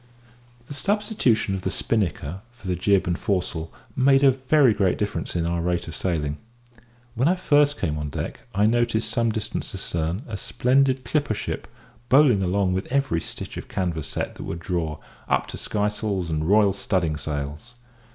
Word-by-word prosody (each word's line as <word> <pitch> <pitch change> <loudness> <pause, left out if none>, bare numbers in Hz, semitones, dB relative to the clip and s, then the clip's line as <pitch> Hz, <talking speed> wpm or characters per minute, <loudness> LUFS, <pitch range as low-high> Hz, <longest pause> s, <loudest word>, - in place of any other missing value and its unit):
The 145 - -8
substitution 200 - +1
of 95 - -2
the 95 - -1
spinnaker 95 -5 -1
for 110 -5 -12
the 90 - +1
jib 95 +2 +2
and 85 0 -1
foresail 90 -4 -1 0.2
made 135 +1 +4
a 135 - +8
very 130 -1 +4
great 95 -3 +1
difference 105 -2 -3
in 85 -1 0
our 85 0 0
rate 85 0 -1
of 85 - -6
sailing. 75 -5 -1 0.7
When 125 +4 +2
I 180 - +4
first 145 -5 +3
came 75 -1 -1
on 75 -1 -3
deck - - -4 0.2
I 100 +1 +4
noticed 115 0 +2
some 115 -2 +2
distance 110 -1 -4
astern 85 +2 -2
a 110 -3 -4
splendid 130 +4 +2
clipper 145 -4 0
ship, - - -4 0.4
bowling 130 -6 +6
along 95 0 +1
with 95 +2 -2
every 135 -11 +1
stitch - - -7
of - - -7
canvas 85 -6 -2
set - - -3
that - - -8
would 85 - -4
draw, 85 -3 -2 0.3
up - - +2
to - - -6
skysails 105 -4 -1
and 80 +2 -1
royal 105 -1 +5
studding 95 -5 0
sails. 75 +10 -5
100 Hz, 175 wpm, -24 LUFS, 85-125 Hz, 0.7 s, a